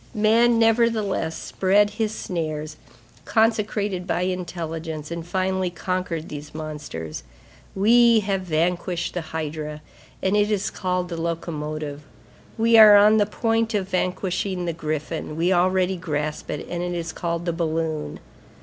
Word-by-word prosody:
Man, 230 Hz, +3 st, +4 dB
nevertheless, 225 Hz, -7 st, +2 dB
spread 205 Hz, +2 st, +2 dB
his 215 Hz, 0 st, -1 dB
snares, 155 Hz, -6 st, -4 dB, 0.5 s
consecrated 210 Hz, -4 st, 0 dB
by 180 Hz, -, 0 dB
intelligence, 165 Hz, -4 st, -4 dB
and 170 Hz, 0 st, -4 dB
finally 185 Hz, +1 st, -1 dB
conquered 175 Hz, -2 st, -3 dB
these 150 Hz, 0 st, -8 dB
monsters. 150 Hz, -, -6 dB, 0.5 s
We 230 Hz, +3 st, +5 dB
have 195 Hz, -1 st, -1 dB
vanquished 175 Hz, +1 st, -1 dB
the 175 Hz, -, -2 dB
hydra, 155 Hz, -1 st, -5 dB, 0.4 s
and 190 Hz, +2 st, +1 dB
it 210 Hz, 0 st, +3 dB
is 210 Hz, -1 st, 0 dB
called 180 Hz, -1 st, -2 dB
the 165 Hz, -2 st, -4 dB
locomotive; 155 Hz, -3 st, -4 dB, 0.6 s
we 230 Hz, 0 st, +5 dB
are 210 Hz, -1 st, +10 dB
on 210 Hz, +2 st, +6 dB
the 205 Hz, -2 st, +3 dB
point 225 Hz, +1 st, 0 dB
of 195 Hz, -2 st, -1 dB
vanquishing 185 Hz, 0 st, -1 dB
the 170 Hz, -, -1 dB
griffin, 155 Hz, 0 st, -4 dB
we 175 Hz, +4 st, +2 dB
already 185 Hz, +1 st, +2 dB
grasp 150 Hz, -2 st, -3 dB
it, 150 Hz, -, -4 dB
and 175 Hz, 0 st, -4 dB
it 175 Hz, 0 st, -2 dB
is 170 Hz, -1 st, -4 dB
called 170 Hz, 0 st, -3 dB
the 170 Hz, -, 0 dB
balloon. 160 Hz, -2 st, -2 dB
180 Hz, 140 wpm, -23 LUFS, 160-205 Hz, 0.6 s, are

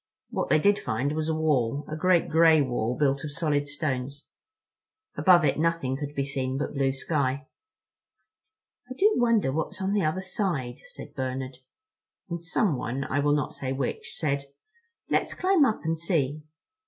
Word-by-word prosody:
What -, -, -2 dB
they -, -, +5 dB
did 200 Hz, +6 st, +3 dB
find 125 Hz, +6 st, -1 dB
was 155 Hz, +1 st, -1 dB
a 160 Hz, -, +1 dB
wall—a 145 Hz, -2 st, 0 dB
great 175 Hz, +2 st, +3 dB
gray 160 Hz, 0 st, +5 dB
wall 125 Hz, -3 st, -1 dB
built 140 Hz, -1 st, +1 dB
of 150 Hz, -, -5 dB
solid 145 Hz, -2 st, 0 dB
stones—above 155 Hz, -, -2 dB
it 145 Hz, -, +1 dB
nothing 165 Hz, -5 st, 0 dB
could 145 Hz, +1 st, -6 dB
be 140 Hz, -, 0 dB
seen 135 Hz, -1 st, -2 dB
but 145 Hz, -, -3 dB
blue 135 Hz, -2 st, +1 dB
sky. 135 Hz, -1 st, -1 dB, 1.4 s
"I 255 Hz, -, -6 dB
do 420 Hz, +8 st, +4 dB
wonder 230 Hz, -, +3 dB
what's 160 Hz, +6 st, -3 dB
on 195 Hz, +1 st, -1 dB
the 205 Hz, -3 st, +2 dB
other 155 Hz, +5 st, 0 dB
side," 180 Hz, -, -2 dB
said -, -, -11 dB
Bernard; 130 Hz, -1 st, -4 dB, 0.7 s
and 170 Hz, -1 st, -3 dB
someone, 150 Hz, -, 0 dB
I 130 Hz, -, -1 dB
will 145 Hz, 0 st, +3 dB
not 145 Hz, -, -2 dB
say 130 Hz, -1 st, -3 dB
which, 135 Hz, -1 st, -4 dB
said: 140 Hz, -3 st, -1 dB, 0.6 s
"Let's -, -, 0 dB
climb 370 Hz, -5 st, +4 dB
up 220 Hz, -, 0 dB
and 160 Hz, 0 st, -1 dB
see." 155 Hz, -4 st, 0 dB
150 Hz, 160 wpm, -27 LUFS, 135-170 Hz, 1.4 s, they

